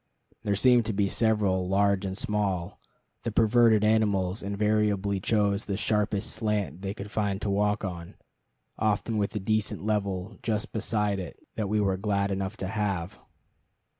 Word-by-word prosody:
There 105 -2 0
seemed 120 +2 +5
to 110 - 0
be 100 0 +1
several, 100 -5 +1
large 100 0 +2
and 95 0 -4
small; 100 -5 0
and - - -23 0.5
the - - -3
perverted 115 -1 +4
animals 105 -3 +2
invariably 100 -1 +1
chose 100 0 +1
the 100 -2 -2
sharpest 105 -1 0
slant 105 -5 -2
they 100 +1 -4
could 105 -1 -8
find 100 -3 -1
to 100 - 0
walk 105 +1 +1
on, 85 -2 -6 0.6
often 110 +1 0
with 100 +2 -1
a - - 0
decent 110 0 -1
level 100 -3 -2
just 110 -2 -1
beside 105 -3 0
it 90 -3 -7 0.2
that 105 -3 -2
we 105 +1 +1
were 95 -2 +1
glad 100 0 0
enough 95 +2 -3
to 95 - -4
have. 100 -4 -2
105 Hz, 165 wpm, -27 LUFS, 95-110 Hz, 0.6 s, seemed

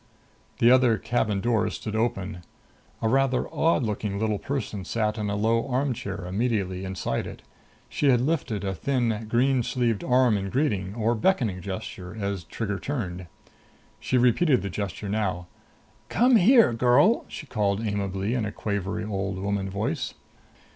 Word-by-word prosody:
The 120 - +5
other 125 -3 +5
cabin 110 -4 0
door 115 -1 +1
stood 110 -1 -5
open. 105 -4 -1 0.6
A - - +3
rather 130 +1 +2
odd 165 -4 +2
looking 105 -2 -2
little 105 -1 0
person 130 -8 -4
sat 110 +2 -1
in 105 -1 -2
a 100 - -1
low 115 +4 +1
armchair 125 -8 -2
immediately 95 -2 -1
inside 95 -9 -3
it. - - -10 0.4
She 145 - +1
had 125 -2 +5
lifted 125 - -1
a 95 -1 -1
thin, 115 +1 -1
green 130 +3 +3
sleeved 115 -3 0
arm 125 -3 +3
in 100 0 -3
a - - -5
greeting 105 -7 -1
or 115 0 +1
beckoning 115 - +1
gesture 95 0 -6
as 100 -3 -3
Trigger 100 -3 -3
turned. 95 -11 -4 0.7
She 130 - 0
repeated 125 - +3
the 100 - -3
gesture 100 +1 -4
now. 100 -4 -1 0.6
"Come 245 0 +5
here, 220 - +6
girl!" 125 - +4
she - - -8
called 105 -4 -1
amiably 100 0 -2
in 125 -3 0
a 105 - -3
quavery 100 0 -3
old 100 -2 -3
woman 100 0 -2
voice. 100 +2 -3
110 Hz, 155 wpm, -26 LUFS, 100-125 Hz, 0.7 s, here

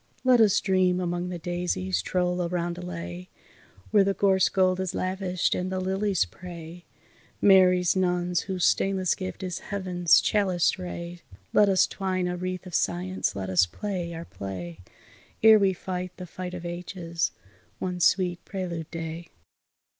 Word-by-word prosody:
Let 255 -2 +5
us 205 -2 +5
dream 185 -2 +2
among 175 0 -2
the 180 - -4
daisies, 170 - -2
troll 180 - 0
a 175 - 0
roundelay 175 0 -4 0.6
Where 210 -2 +6
the 195 0 0
gorse 190 -2 +3
gold 185 -1 +2
is 190 -2 -2
lavished, 185 -1 -1
and 180 +1 -2
the 185 - -1
lilies 190 - +1
pray, 170 - -10 0.5
Mary's 185 -2 +5
nuns, 180 -1 +1
whose 185 -3 -1
stainless 190 -2 +2
gift 185 0 -6
is 180 -2 -3
Heaven's 180 -5 +2
chaliced 190 -3 +1
ray, 175 -1 -6 0.3
Let 205 -1 +5
us 190 -1 +4
twine 185 -2 -2
a 180 - -2
wreath 185 0 -4
of 180 - -10
science, 95 - -1
let 95 -1 -4
us 90 -1 +4
play 180 - -4
our 165 +1 -7
play, 90 - -7 0.6
Ere 220 -1 +8
we 195 -1 +3
fight 180 0 -5
the 180 - -7
fight 180 +1 -7
of 175 -1 -7
ages, 175 -1 -3 0.5
one 180 -1 -3
sweet 175 0 +2
prelude 175 -5 -5
day. 165 0 -6
180 Hz, 155 wpm, -26 LUFS, 170-185 Hz, 0.6 s, Ere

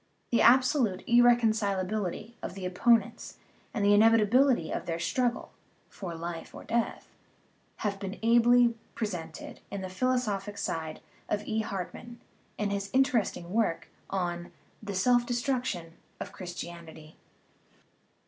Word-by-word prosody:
The 235 - +3
absolute 245 -5 +4
irreconcil 230 -4 +4
ability 210 +3 -3
of - - -6
the 190 -2 -6
opponents 205 +4 +1 0.3
and 205 -3 -1
the 205 - +6
inevitability 225 - +4
of - - -4
their 165 -1 -1
struggle 245 +7 -1 0.4
("for 175 -4 -7
life 165 0 -6
or - - -9
death") 235 0 -2 0.8
have 200 -1 -1
been 195 +1 -5
ably 235 +1 +5 0.2
presented 175 -7 -5
on 200 -1 -4
the 185 - -5
philosophic 205 -2 -1
side 160 -4 -4 0.3
by 210 0 -1
E. 220 0 -1
Hartmann, 220 +4 -5 0.4
in 210 -1 -1
his 200 0 -3
inter 260 -2 +3
esting 175 -4 -5
work 210 -4 0 0.2
on 175 -2 -3 0.3
The 205 -2 -5
Self 245 +5 +3
Destruction 240 -9 -2 0.3
of - - -6
Christianity. 170 -3 -9
205 Hz, 130 wpm, -29 LUFS, 180-235 Hz, 0.8 s, the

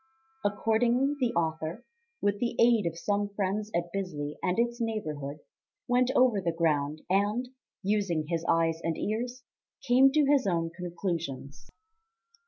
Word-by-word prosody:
Accordingly, 235 +6 +2
the 250 -3 +1
author, 160 +5 -2 0.4
with 205 0 +1
the 235 0 -1
aid 230 -5 +5
of 165 0 -4
some 205 +2 0
friends 205 +2 -1
at 170 0 -1
Bisley 150 -7 -3
and 180 +2 0
its 235 +1 0
neighbourhood, 155 -10 -3 0.5
went 250 +1 +3
over 245 -6 +4
the 170 -2 0
ground, 155 -2 0
and, 205 +6 +1 0.3
using 195 -6 0
his 165 0 -1
eyes 165 0 +2
and 165 -1 -1
ears, 245 +4 -3 0.4
came 265 +1 +5
to 300 -1 +4
his 275 -4 +3
own 165 -3 0
conclusions. 170 -6 -5
195 Hz, 140 wpm, -29 LUFS, 165-235 Hz, 0.5 s, aid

